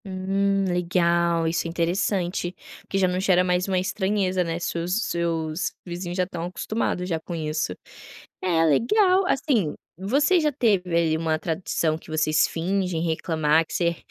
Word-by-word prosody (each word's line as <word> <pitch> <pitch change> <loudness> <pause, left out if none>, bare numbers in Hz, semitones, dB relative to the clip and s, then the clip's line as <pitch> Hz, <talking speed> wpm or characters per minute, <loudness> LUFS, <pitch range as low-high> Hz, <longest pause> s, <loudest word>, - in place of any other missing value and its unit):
Hum, 195 +1 0
legal. 170 -1 +1
Isso 165 +1 -1
é - - -4
interessante, 175 +1 -1 0.3
porque 195 - -4
já 190 -1 +3
não 180 0 -1
gera 185 -1 +3
mais 180 +1 +1
uma 190 -1 0
estranheza, 190 0 0
né, 165 -1 -3
se 170 0 -3
os 180 +6 -1
seus 165 -1 -1
vizinhos 175 0 -5
já 185 - +3
estão 175 -2 -5
acostumados 180 0 -2
já 165 -3 -1
com 170 +2 -7
isso. 155 - -2 0.7
É, 170 -3 +2
legal, 365 - +3
assim, 235 - +1 0.2
você 280 - +2
já 305 -1 +2
teve 215 -10 +1
ali 165 -2 +2
uma 160 -1 0
tradução 160 -1 -1
que 160 - -13
vocês 155 0 +2
fingem 180 0 -1
reclamar, 160 -1 +1
que - - -12
você 170 -1 0
180 Hz, 160 wpm, -24 LUFS, 165-195 Hz, 0.7 s, já